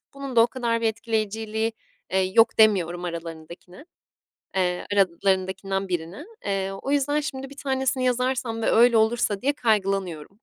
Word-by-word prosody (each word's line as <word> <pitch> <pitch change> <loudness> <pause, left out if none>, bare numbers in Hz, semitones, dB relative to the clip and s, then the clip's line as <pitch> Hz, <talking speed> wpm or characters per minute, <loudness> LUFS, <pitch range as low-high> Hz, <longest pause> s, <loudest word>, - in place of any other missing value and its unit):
"bunun 275 -2 -7
da - - +8
o 230 - +6
kadar 235 -3 -1
bir 230 - +1
etkileyiciliği, 220 0 -2 0.4
eee, 190 - +3 0.2
yok" 225 - +4
demiyorum 180 -5 +3
aralarındakine, 170 - -8 0.7
eee, 180 -1 0
aralarındakinden 190 +1 0
birine. 175 - -4 0.2
Eee, 195 -1 -1
o 195 +8 -6
yüzden 290 +1 +1
şimdi 270 -2 -6
bir 280 - -12
tanesini 265 -2 -1
yazarsam 250 -2 -1
ve - - +2
öyle 235 +1 +5
olursa 220 -2 +2
diye 285 +2 +2
kaygılanıyorum. 195 - -1
220 Hz, 145 wpm, -24 LUFS, 190-250 Hz, 0.7 s, da